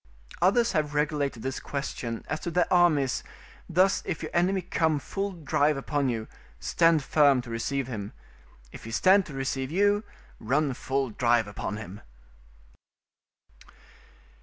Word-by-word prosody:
Others 230 +7 +3
have 150 -1 -1
regulated 145 -5 -1
this 130 0 -3
question 120 -5 -5
as - - -2
to 170 - -4
their 175 0 +2
armies 155 -7 +3 0.5
thus 185 +3 +3
if 160 - -4
your - - -5
enemy 185 +2 +1
come 160 -3 +1
full 195 +7 -3
drive 150 -3 +1
upon 140 0 -1
you, 110 -2 -3 0.3
stand 165 -3 +3
firm 140 -2 +4
to 120 - -9
receive 135 +4 -2
him; 110 -5 -6 0.6
if - - -11
he - - -7
stand 190 - +4
to 150 - -9
receive 135 0 -2
you, 205 +5 +2 0.4
run 140 +5 0
full 135 0 -2
drive 120 -1 +2
upon 105 0 -5
him. 105 -2 -9
145 Hz, 140 wpm, -27 LUFS, 130-175 Hz, 0.6 s, firm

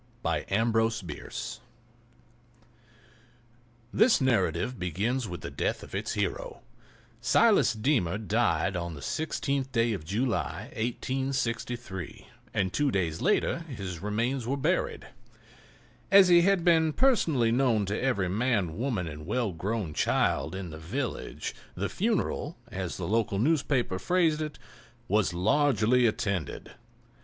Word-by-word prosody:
A 85 +1 +1
JUG 115 +3 +1
OF 115 0 +3
SIRUP 90 -10 -8 2.6
THIS 225 +3 +5
narrative 120 - +1
begins 105 +8 -1
with 90 -2 -6
the - - -6
death - - -2
of - - -12
its - - -2
hero. - - -3 0.6
Silas - - +4
Deemer 110 - +1
died 105 -3 +1
on 85 -2 -3
the 70 - -10
16th 140 - -2
day 115 -2 +2
of 95 -7 -5
July, 110 +9 -2
1863, 120 -4 -3 0.3
and 95 -2 -1
two 145 -1 +2
days 85 -8 -1
later - - +2
his 95 - -5
remains 115 +5 -1
were 135 +2 0
buried. 160 +7 0 1.0
As 195 -2 +7
he 175 -1 +7
had 185 -1 +2
been 160 -2 +4
personally 160 - +3
known 120 -4 +2
to 100 +2 -2
every 100 -8 +1
man, 100 -4 0
woman 115 -9 -1
and 75 0 -8
well 120 -3 0
grown 95 0 -3
child 80 +3 +1
in 95 -3 -5
the 80 - -8
village, 115 - -4 0.2
the 100 +3 -2
funeral, 205 -6 -1
as 95 -5 -4
the - - -4
local 110 -2 +1
newspaper 130 -5 +1
phrased 165 - +2
it, 150 -1 -4 0.5
"was 105 -2 +2
largely 120 +4 +3
attended." 100 - -2
115 Hz, 130 wpm, -28 LUFS, 95-135 Hz, 2.6 s, As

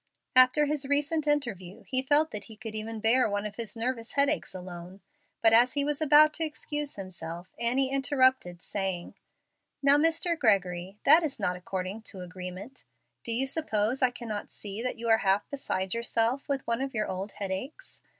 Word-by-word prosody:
After 255 +4 +6
his 290 -1 -2
recent 295 +2 0
interview 225 -11 -2
he 260 0 0
felt 290 +4 +3
that 210 - -5
he 220 - -13
could 225 -1 -8
even 220 +1 -5
bear 230 +2 +3
one 205 0 -2
of 210 - -6
his 230 -1 -2
nervous 230 0 -3
headaches 280 -7 +1
alone. 180 +1 -9 0.4
But 225 0 +6
as 240 +2 +6
he 285 -1 0
was 295 +1 -2
about 305 0 +6
to 325 - -2
excuse 295 -1 -4
himself, 175 -2 -8
Annie 260 +3 +1
interrupted, 260 - +1
saying, 190 -3 -3 0.7
"Now, 280 +1 +7
Mr. 330 +2 +1
Gregory, 190 - 0
that 310 +4 +7
is 310 -5 -3
not 180 - 0
according 185 +3 -5
to 190 - -9
agreement. 185 +7 -8 0.4
Do 235 - -3
you 245 +4 +1
suppose 255 -5 -1
I 255 - +5
cannot 230 -4 -6
see 205 +1 -6
that 250 +1 -3
you 230 0 -5
are 225 -1 +5
half 195 +1 +1
beside 190 -9 -2
yourself 235 +3 0
with 275 -1 -1
one 235 +2 -1
of 270 -2 -4
your 215 -1 0
old 190 +2 -5
headaches? 205 - -6
230 Hz, 180 wpm, -28 LUFS, 195-280 Hz, 0.7 s, Now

